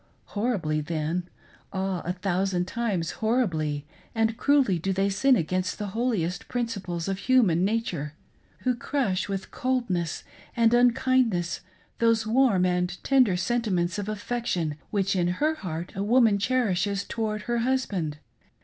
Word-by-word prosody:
Horribly 200 -9 0
then, 165 +3 -2 0.4
Ah, 190 -2 -2
a 175 - -1
thousand 180 -1 0
times 200 -6 -1
horribly 165 - 0 0.3
and 225 0 +2
cruelly 260 -8 +3
do 195 +4 -1
they 195 +1 +1
sin 265 +7 +4
against 185 +1 -1
the 210 -1 -4
holiest 215 -8 -1
principles 200 -8 -3
of 195 -1 -2
human 210 -10 +3
na 215 +4 +2
ture, 150 -6 -4 0.5
who 255 - +2
crush 235 -7 -1
with 195 -1 -4
coldness 235 -11 -1 0.3
and 230 0 +4
unkindness 245 -7 +2 0.4
those 230 -1 +3
warm 220 -5 +3
and 180 0 0
tender 255 -9 +4
sentiments 185 -5 0
of 205 +1 -4
affection 210 -7 -2 0.2
which 195 -1 0
in 175 -2 +2
her 310 +2 +2
heart 175 - -5
a 195 - -2
woman 225 -1 +4
cherishes 200 -4 +1
towards 215 -1 -3
her 240 -1 -1
husband. 210 - -1
200 Hz, 140 wpm, -26 LUFS, 180-235 Hz, 0.5 s, sin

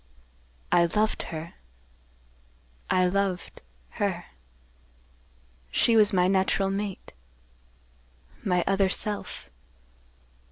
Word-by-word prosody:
"I 170 - +5
loved 215 +5 0 1.7
her—I 185 0 +3
loved—her. 180 - -3 1.4
She 230 - +4
was 210 -2 +5
my 180 -1 +3
natural 195 0 +1
mate—my 60 - -7
other 195 -1 +2
self. 205 - -3
180 Hz, 65 wpm, -27 LUFS, -, 1.7 s, I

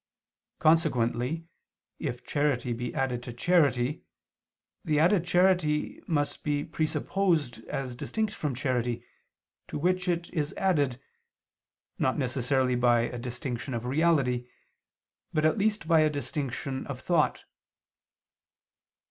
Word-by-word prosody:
Consequently 155 -2 +2 0.5
if - - -4
charity 140 -4 0
be 120 +1 -4
added 125 -2 -1
to 125 - -7
charity, 135 -1 +2 0.8
the 155 -2 +1
added 175 +2 +4
charity 175 -4 +2
must 145 -3 0
be 145 -1 -1
presupposed 155 - 0
as 130 -3 -4
distinct 215 - -2
from 145 - -3
charity 125 -2 -1 0.6
to - - -4
which 180 +4 +1
it 170 -1 0
is 150 -4 -2
added, 145 -10 +1 1.0
not 130 - +1
necessarily 130 -1 +1
by 120 -1 +4
a 120 +1 -3
distinction 125 +1 -4
of 115 +1 -4
reality, 130 -4 +2 0.9
but 155 0 +2
at 155 +7 +3
least 210 +1 0
by 165 -2 +5
a 155 0 +4
distinction 140 -2 -3
of 135 -3 -5
thought. 165 +1 +1
145 Hz, 115 wpm, -28 LUFS, 125-165 Hz, 1.0 s, by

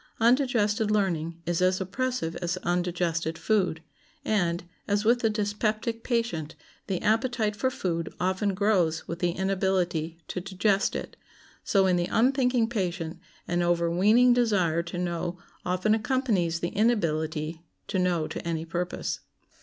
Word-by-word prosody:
Undigested 230 -3 +3
learning 170 -6 0
is 175 0 0
as 185 0 +3
oppressive 200 -2 -2
as 175 0 -2
undigested 175 -2 -1
food; 185 -7 0 0.4
and, 175 -7 +1 0.2
as 205 +1 +1
with 240 +2 +4
the 225 - +2
dyspeptic 215 +2 -1
patient, 230 - -1 0.3
the 190 -4 -1
appetite 225 -1 +1
for 260 +5 +1
food 170 -9 -2
often 190 +2 0
grows 185 -6 +1
with 170 +1 -5
the 175 -1 +1
inability 185 -4 0
to 180 - -4
digest 195 +2 +1
it, - - -5 0.5
so 195 -2 +3
in 180 -1 +3
the 175 0 0
unthinking 250 -1 +3
patient 180 -7 -3 0.3
an 175 0 0
overweening 175 +8 +4
desire 195 -9 +2
to 170 +1 -7
know 175 0 -2 0.3
often 185 +4 +2
accompanies 220 -8 0
the 170 - 0
inability 160 -7 0 0.3
to 190 - -1
know 175 -3 +1
to - - -5
any 165 -1 -2
purpose. 175 +2 -3
185 Hz, 140 wpm, -27 LUFS, 170-220 Hz, 0.5 s, with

